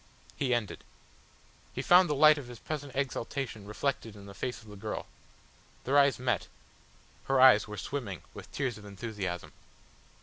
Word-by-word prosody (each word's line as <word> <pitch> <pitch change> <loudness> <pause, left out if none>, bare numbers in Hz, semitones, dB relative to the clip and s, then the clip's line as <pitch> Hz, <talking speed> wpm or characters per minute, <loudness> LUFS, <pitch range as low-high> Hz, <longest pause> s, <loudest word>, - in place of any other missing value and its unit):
He 135 -3 -1
ended. 120 -4 -1 0.9
He - - -3
found 180 -1 +6
the 150 - +1
light 150 +1 +7
of 135 - -9
his 120 -1 -9
present 145 -1 -5
exaltation 130 -4 -3
reflected 115 0 -2
in 100 -1 -12
the 100 - -10
face 125 +4 -4
of - - -17
the 105 - -10
girl. 100 - -5 0.8
Their 135 - 0
eyes 140 -1 +4
met; 125 -1 -1 0.8
her 135 -1 +2
eyes 130 -5 +7
were 105 0 -7
swimming 110 -10 -4
with - - -11
tears 130 -6 -2
of 105 - -13
enthusiasm. 100 -3 -5
125 Hz, 165 wpm, -30 LUFS, 105-140 Hz, 0.9 s, light